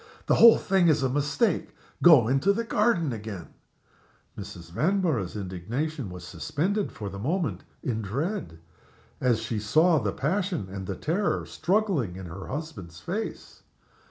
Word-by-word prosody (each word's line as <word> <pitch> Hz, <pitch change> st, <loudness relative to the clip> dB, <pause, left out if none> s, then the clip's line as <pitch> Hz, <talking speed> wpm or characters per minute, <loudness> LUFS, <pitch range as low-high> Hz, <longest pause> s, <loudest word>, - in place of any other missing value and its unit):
"The -, -, +3 dB
whole 230 Hz, -1 st, +8 dB
thing 190 Hz, -3 st, +2 dB
is 150 Hz, -4 st, +3 dB
a 130 Hz, -, +2 dB
mistake. 145 Hz, -, 0 dB, 0.3 s
Go 155 Hz, -10 st, +7 dB
into 135 Hz, +10 st, +3 dB
the 230 Hz, +3 st, -1 dB
garden 210 Hz, -, +1 dB
again!" 105 Hz, -4 st, -7 dB, 0.8 s
Mrs. 85 Hz, -1 st, -9 dB
Vanborough's 155 Hz, -, 0 dB
indignation 110 Hz, -, -4 dB
was 90 Hz, -1 st, -9 dB
suspended 190 Hz, -, -2 dB
for 105 Hz, -, -7 dB
the 100 Hz, 0 st, -6 dB
moment 140 Hz, -, -1 dB, 0.2 s
in 115 Hz, -3 st, -1 dB
dread, 135 Hz, -, -3 dB, 0.6 s
as 125 Hz, -3 st, +2 dB
she 110 Hz, -, -2 dB
saw 155 Hz, -, +4 dB
the 105 Hz, -5 st, -1 dB
passion 175 Hz, -, -1 dB
and 95 Hz, -1 st, -6 dB
the 95 Hz, -, -3 dB
terror 180 Hz, -, -1 dB
struggling 175 Hz, -, 0 dB
in 95 Hz, 0 st, -7 dB
her 90 Hz, +3 st, -8 dB
husband's 110 Hz, -, -6 dB
face. 205 Hz, -, -5 dB
135 Hz, 145 wpm, -27 LUFS, -, 0.8 s, whole